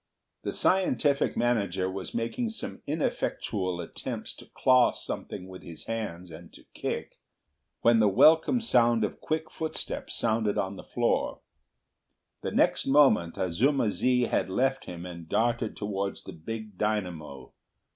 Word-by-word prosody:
The - - -3
scientific 155 -6 +2
manager 100 -6 +1
was 95 0 -5
making 120 - -1
some 225 - -6
ineffectual 100 - -1
attempts 85 - -5
to - - -13
claw 130 -1 +4
something 90 - -6
with 95 0 -10
his 85 -2 -9
hands 90 -6 -4
and 80 +1 -11
to - - -14
kick, - - -4 0.6
when 115 -1 +5
the 105 - +5
welcome 160 - +5
sound 120 - +3
of 105 - -3
quick 160 0 -2
footsteps 160 -1 -4
sounded 110 -2 +1
on 95 +1 -1
the - - -9
floor. - - 0 1.0
The - - -2
next - - +2
moment 135 - +4
Azuma 110 - +2
zi 125 +2 +2
had 115 - 0
left 135 +7 0
him 85 0 -7
and 85 -2 -9
darted 115 -1 0
towards 100 -1 -3
the 95 - -9
big 105 +4 -7
dynamo. 90 -11 -3
110 Hz, 140 wpm, -28 LUFS, 90-130 Hz, 1.0 s, when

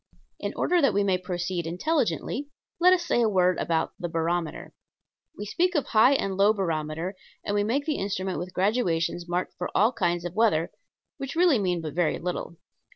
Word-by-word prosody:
In - - -3
order 355 -1 +2
that 275 - +3
we 205 - +3
may 190 -2 +1
proceed 180 -1 -3
intelligently, 285 - -1 0.3
let 360 +1 +6
us 355 -2 +2
say 240 - +2
a 225 - +3
word 185 -3 +2
about 165 -1 0
the 175 - -3
barometer. 165 0 -2 0.6
We 205 - -5
speak 355 - 0
of 290 - +1
high 230 +5 +5
and 195 -8 -1
low 200 +2 +4
barometer, 165 -2 -2 0.3
and 205 - -2
we 205 0 +2
make 265 +7 0
the 305 -2 -1
instrument 190 -3 -2
with 180 +2 -6
graduations 175 -4 0
marked 175 +1 -2
for 180 - -2
all 220 +5 +4
kinds 175 -6 -1
of 175 - -4
weather, 205 -7 +2 0.5
which 275 +1 -6
really 335 -7 +4
mean 180 -3 0
but 155 -3 -5
very 170 -1 +1
little. 175 0 -4
190 Hz, 190 wpm, -26 LUFS, 175-235 Hz, 0.6 s, let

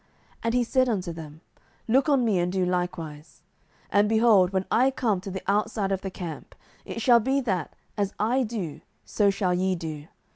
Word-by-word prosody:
07:007:017 - - -37 0.4
And 230 - +1
he 250 - +3
said 255 +2 +2
unto 185 -6 -2
them, 160 -1 -10 0.5
Look 265 +6 +3
on 270 -4 +3
me, 205 -5 +2
and 175 +1 0
do 185 -1 0
likewise: 170 -4 -4 0.5
and, 205 +1 +3
behold, 220 -5 +5
when 190 -1 -1
I 255 +3 +4
come 225 -8 -1
to 195 - -7
the 190 0 -6
outside 205 0 0
of 190 -1 -1
the 195 - -4
camp, 175 -4 -8 0.3
it - - -5
shall 240 -1 +6
be 265 +5 +1
that, 190 - -2 0.2
as 200 -1 0
I 240 +5 +1
do, 210 - -4 0.2
so 205 -2 +2
shall 195 -2 0
ye 185 +1 +1
do. 155 -3 -6
195 Hz, 195 wpm, -26 LUFS, 180-230 Hz, 0.5 s, shall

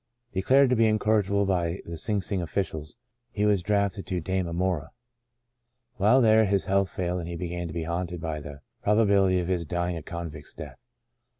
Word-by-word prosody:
Declared 130 +8 +4
to - - +4
be 115 -1 +4
incorrigible 105 -2 +2
by 90 -2 0
the 85 - -6
Sing 100 +4 -1
Sing 95 0 -2
officials, 80 -2 -4 0.3
he 105 -3 -1
was 105 -3 +3
drafted 100 +1 0
to 95 -2 -1
Damemora. 90 -2 -1 1.1
While 110 +7 +5
there 110 -1 +5
his 100 -1 +1
health 95 0 +2
failed 90 0 -2
and 85 -1 -5
he 85 - -5
began 85 0 -4
to 80 - -7
be 85 - -2
haunted 85 +1 -3
by 80 -2 -3
the 70 -1 -10 0.2
probabil 100 -2 +4
ity 95 0 +2
of 85 - -2
his 90 -2 0
dying 85 +2 -2
a 85 - -5
convict's 80 -2 -7
death. - - -9
95 Hz, 185 wpm, -27 LUFS, 85-100 Hz, 1.1 s, While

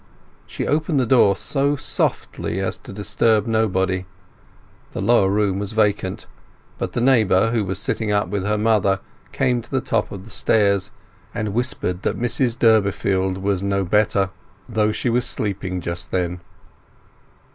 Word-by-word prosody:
She - - -4
opened 150 0 +1
the 130 - +2
door 115 -5 +4
so 140 0 0
softly 95 -7 -2
as 95 -1 -1
to - - -11
disturb 105 +2 +1
nobody; 95 -5 0 0.9
the - - -4
lower 100 -1 +3
room 100 -1 +1
was 100 +1 -3
vacant, 105 -3 0 0.5
but - - -3
the 120 - -1
neighbour 115 -5 +3
who 115 -2 +1
was 95 -1 -3
sitting 105 +2 -2
up 105 -2 +1
with 100 +1 -2
her 105 +1 0
mother 105 -3 +2 0.3
came 125 -1 +1
to 115 - -16
the 135 - 0
top - - -1
of 95 -2 -7
the 115 - -12
stairs, 100 -3 +2 0.5
and 105 -2 -2
whispered 110 -6 -2
that - - -1
Mrs 120 0 +1
Durbeyfield 100 -4 +2
was 95 -1 -1
no 100 0 0
better, 100 0 +1 0.4
though 110 -1 +1
she 115 - -3
was 120 +1 +2
sleeping 95 -5 -3
just 85 +1 -4
then. 90 -1 -2
105 Hz, 155 wpm, -21 LUFS, 95-115 Hz, 0.9 s, door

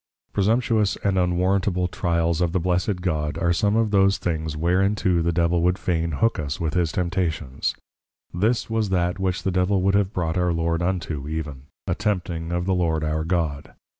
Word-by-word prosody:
Presumptuous 110 0 +2
and 100 -1 +1
Unwarrantable 90 +1 +1
Trials 85 -1 0
of 85 -1 +1
the 95 - +2
Blessed 90 +2 0
God, 75 -4 -1
are 85 0 +2
some 105 +4 +1
of 110 -2 +2
those 100 -1 +4
things 80 -3 -3
whereinto 90 +1 +2
the 85 +1 +1
Devil 85 0 +1
would 90 +2 +2
fain 85 -4 -1
hook 115 +9 +1
us 75 -1 -3
with 80 -2 -1
his 85 -4 +1
Temptations. 85 -7 -2 0.6
This 110 +7 +1
was 110 -2 -1
that 90 0 0
which 95 -1 -1
the 95 - 0
Devil 90 +1 +1
would 100 +1 +3
have 100 -1 +2
brought 85 -2 -1
our 90 -1 +1
Lord 85 0 0
unto, 85 -6 -2
even, 75 -3 -5 0.2
A - - 0
tempting 85 -5 -2
of 85 0 -1
the 95 - +1
Lord 80 -3 0
our 75 0 -1
God. 80 -4 -2
90 Hz, 185 wpm, -23 LUFS, 80-95 Hz, 0.6 s, those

